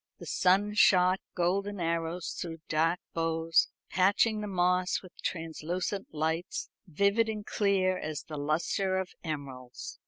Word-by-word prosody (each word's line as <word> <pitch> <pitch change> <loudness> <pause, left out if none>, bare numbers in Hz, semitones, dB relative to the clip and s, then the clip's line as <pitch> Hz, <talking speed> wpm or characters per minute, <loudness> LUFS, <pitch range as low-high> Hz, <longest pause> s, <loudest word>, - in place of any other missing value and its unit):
The - - -10
sun 195 +3 +2
shot 185 -2 +5 0.2
golden 195 +3 0
arrows 165 +1 -1
through 165 -2 -6
dark 165 +3 +2
boughs, 165 0 +2 0.2
patching 205 +4 +3
the 210 - -4
moss 180 0 +1
with 185 - -12
translucent 175 +4 -3
lights, 160 +4 -2 0.2
vivid 200 +7 +2
and 210 -1 -4
clear 190 -3 +1
as 155 -1 -4
the 150 - -7
lustre 170 +6 0
of 190 -1 -3
emeralds. 135 -5 -6
180 Hz, 130 wpm, -30 LUFS, 160-195 Hz, 0.2 s, shot